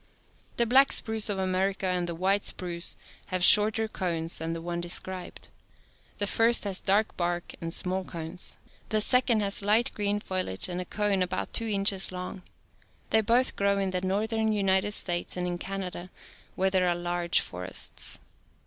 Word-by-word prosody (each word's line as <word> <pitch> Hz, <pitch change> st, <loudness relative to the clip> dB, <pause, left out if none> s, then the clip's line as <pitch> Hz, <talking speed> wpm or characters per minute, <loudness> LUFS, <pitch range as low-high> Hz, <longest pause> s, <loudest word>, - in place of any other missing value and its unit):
The 235 Hz, -, +3 dB
black 265 Hz, +4 st, +5 dB
spruce 220 Hz, -1 st, 0 dB
of 200 Hz, -, -1 dB
America 190 Hz, +1 st, -1 dB
and 180 Hz, -1 st, -1 dB
the 170 Hz, -, -4 dB
white 195 Hz, +4 st, +1 dB
spruce 175 Hz, -1 st, -2 dB, 0.3 s
have 185 Hz, -1 st, -2 dB
shorter 215 Hz, +3 st, +6 dB
cones 170 Hz, -5 st, -3 dB
than 165 Hz, +1 st, -3 dB
the 165 Hz, -, -4 dB
one 170 Hz, +1 st, -4 dB
described. 180 Hz, +1 st, -3 dB, 0.7 s
The 205 Hz, -, 0 dB
first'has 210 Hz, -3 st, +2 dB
dark 210 Hz, +3 st, +1 dB
bark 175 Hz, 0 st, -2 dB
and 165 Hz, 0 st, -4 dB
small 185 Hz, +2 st, -1 dB
cones; 170 Hz, +1 st, -7 dB, 0.3 s
the 215 Hz, -, +1 dB
second 235 Hz, 0 st, +4 dB
has 200 Hz, 0 st, +2 dB
light 215 Hz, +5 st, +2 dB
green 205 Hz, 0 st, -1 dB
foliage 185 Hz, -, -1 dB
and 180 Hz, 0 st, -4 dB
a -, -, -6 dB
cone 205 Hz, 0 st, 0 dB
about 180 Hz, -, -2 dB
two 230 Hz, -, -1 dB
inches 195 Hz, -2 st, +3 dB
long. 180 Hz, 0 st, -6 dB, 0.7 s
They 220 Hz, -, +5 dB
both 240 Hz, +4 st, +2 dB
grow 200 Hz, 0 st, +1 dB
in 195 Hz, -1 st, -1 dB
the 180 Hz, -1 st, -2 dB
northern 220 Hz, +4 st, 0 dB
United 195 Hz, 0 st, +2 dB
States 175 Hz, -3 st, -2 dB
and 180 Hz, -, -2 dB
in 175 Hz, -1 st, -3 dB
Canada 185 Hz, -2 st, -5 dB, 0.5 s
where 190 Hz, 0 st, +1 dB
there 185 Hz, -1 st, +2 dB
are 175 Hz, -, +1 dB
large 175 Hz, 0 st, +1 dB
forests. 90 Hz, +1 st, -3 dB
190 Hz, 165 wpm, -28 LUFS, 175-210 Hz, 0.7 s, shorter